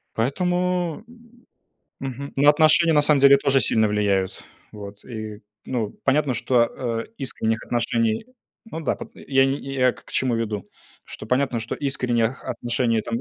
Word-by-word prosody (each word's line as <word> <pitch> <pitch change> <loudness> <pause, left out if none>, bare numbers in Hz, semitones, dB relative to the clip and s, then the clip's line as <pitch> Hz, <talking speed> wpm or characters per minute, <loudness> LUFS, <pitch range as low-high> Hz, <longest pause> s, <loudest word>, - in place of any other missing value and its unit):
Поэтому, 180 - -1 1.0
мгм, 135 +1 -6
ну, 145 +2 +5
отношения 155 +2 +5
на 150 - +5
самом 145 -1 +3
деле 140 0 +7
тоже 135 -1 +2
сильно 110 -1 +3
влияют, 100 -2 0 0.3
вот. 100 -1 -10 0.7
Ну 115 -5 -2
и - - -18
понятно, 140 0 +2
что, 125 0 +2
а, 115 -3 -3
искренних 110 -4 -2
отношений, 115 - 0 0.4
ну 165 -7 -7
да, - - -1
пот - - -10
я 135 -1 +2
не 135 +1 0
я 135 -2 0
я - - +4
к - - -18
к - - -14
чему 125 -3 0
веду, 110 -4 -3 0.4
что - - -9
понятно, 125 0 0
что 115 - -4
искренних 125 -3 -1
отношений 120 -2 -1
там 230 - -4
130 Hz, 160 wpm, -23 LUFS, 115-140 Hz, 1.0 s, деле